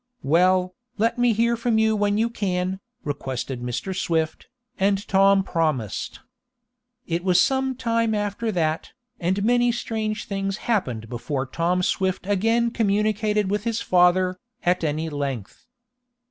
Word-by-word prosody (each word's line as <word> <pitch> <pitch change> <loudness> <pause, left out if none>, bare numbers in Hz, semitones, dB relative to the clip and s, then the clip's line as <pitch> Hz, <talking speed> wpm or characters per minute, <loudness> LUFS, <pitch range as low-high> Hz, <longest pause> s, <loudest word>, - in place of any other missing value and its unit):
"Well, 180 +4 +3 0.2
let 225 +3 +1
me 245 -1 +4
hear 230 +2 +2
from 230 -1 0
you 220 0 +3
when 205 0 +1
you 225 +2 +2
can," 185 -3 -2 0.2
requested 130 -3 -4
Mr. 125 +10 -3
Swift, 160 -3 -1 0.3
and 195 +1 +1
Tom 195 0 +4
promised. 155 - -2 0.8
It 170 +1 -2
was 185 -1 +4
some 265 +2 +2
time 230 -3 0
after 210 +2 -2
that, 160 -3 -1 0.3
and 190 +3 0
many 240 +1 +3
strange 220 -2 -3
things 195 0 -2
happened 125 - -1
before 125 +3 -3
Tom 175 +6 0
Swift 185 0 0
again 225 +4 +2
communicated 210 -1 +1
with 205 0 0
his 230 -1 -1
father, 180 0 +3 0.2
at 180 0 +1
any 155 +1 -1
length. 140 - -5
195 Hz, 135 wpm, -24 LUFS, 165-220 Hz, 0.8 s, me